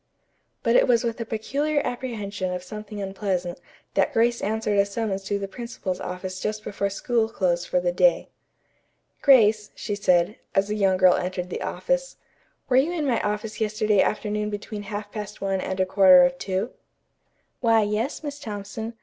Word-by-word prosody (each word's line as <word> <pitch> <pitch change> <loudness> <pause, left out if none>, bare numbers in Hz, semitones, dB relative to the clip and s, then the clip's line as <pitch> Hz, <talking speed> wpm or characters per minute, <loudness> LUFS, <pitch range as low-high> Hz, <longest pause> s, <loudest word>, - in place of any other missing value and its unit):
But 230 +1 +3
it - - +5
was 240 -1 +3
with 230 0 -2
a - - -3
peculiar 280 +7 -1
apprehension 210 -7 -3
of 180 0 -4
something 210 +2 -8
unpleasant 190 -3 -3 0.3
that - - +2
Grace 235 +1 +2
answered 210 -1 0
a 200 - +5
summons 200 -2 -2
to 205 +1 0
the 200 0 -4
principal's 205 -4 -5
office 185 +1 -5
just 215 +2 -3
before 200 -1 -2
school 225 +3 0
closed 175 -4 0
for 180 - +1
the 175 0 0
day. 175 -1 +3 0.9
"Grace," 215 -6 +5
she 210 - -4
said, 180 -1 +2 0.2
as 195 +1 +2
the 210 - -1
young 195 -3 +2
girl 185 -1 +6
entered 180 0 -3
the - - -4
office, - - -2 0.5
"were 255 - +3
you 285 +6 +3
in 325 -4 -2
my 245 -5 +1
office 210 +1 -3
yesterday 215 -2 +2
afternoon 210 0 -1
between 205 0 -5
half 205 0 -5
past 210 -1 -6
one 195 -1 -1
and 190 0 -4
a 185 - +3
quarter 185 -1 +7
of 175 0 0
two?" 195 +5 -2 0.9
"Why, 225 -2 +4
yes, 215 +9 -2
Miss 290 -1 -5
Thompson. 220 -1 -6
210 Hz, 175 wpm, -25 LUFS, 190-225 Hz, 0.9 s, quarter